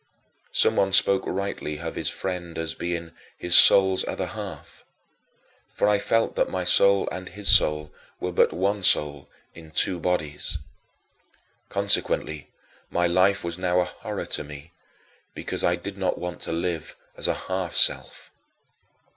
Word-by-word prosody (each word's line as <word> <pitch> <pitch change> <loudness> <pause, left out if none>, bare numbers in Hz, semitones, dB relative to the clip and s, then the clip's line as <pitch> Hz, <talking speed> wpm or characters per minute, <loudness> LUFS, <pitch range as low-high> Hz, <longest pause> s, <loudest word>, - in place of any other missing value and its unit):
Someone 95 0 +2
spoke 95 0 +3
rightly 95 -5 -4
of 80 +1 -6
his - - -2
friend 85 -3 -5
as 80 -1 -3
being 85 -1 -5 0.3
"his 90 0 -2
soul's 95 -1 +7
other - - -3
half" - - -9 0.9
for - - 0
I 105 -1 +2
felt 115 +2 0
that - - 0
my 95 -1 -3
soul 100 +2 +4
and 90 0 -7
his 105 -1 -5
soul 75 0 +4 0.3
were 90 - -3
but 90 - +2
one 100 +2 -1
soul 75 -6 +2 0.2
in 80 -2 -14
two 85 +3 0
bodies. 80 -4 -3 1.1
Consequently, 75 -2 0 0.4
my 90 - 0
life 95 +3 +2
was 85 +1 -5
now 90 -1 +1
a 90 - +1
horror - - -7
to - - -5
me 75 +2 -12 0.6
because - - -5
I 85 - +2
did 100 +3 -9
not 95 - -1
want 90 0 -6
to - - -4
live 85 -1 -4 0.2
as - - -2
a - - 0
half 95 -2 -4
self. - - +2
90 Hz, 150 wpm, -24 LUFS, 80-95 Hz, 1.1 s, soul's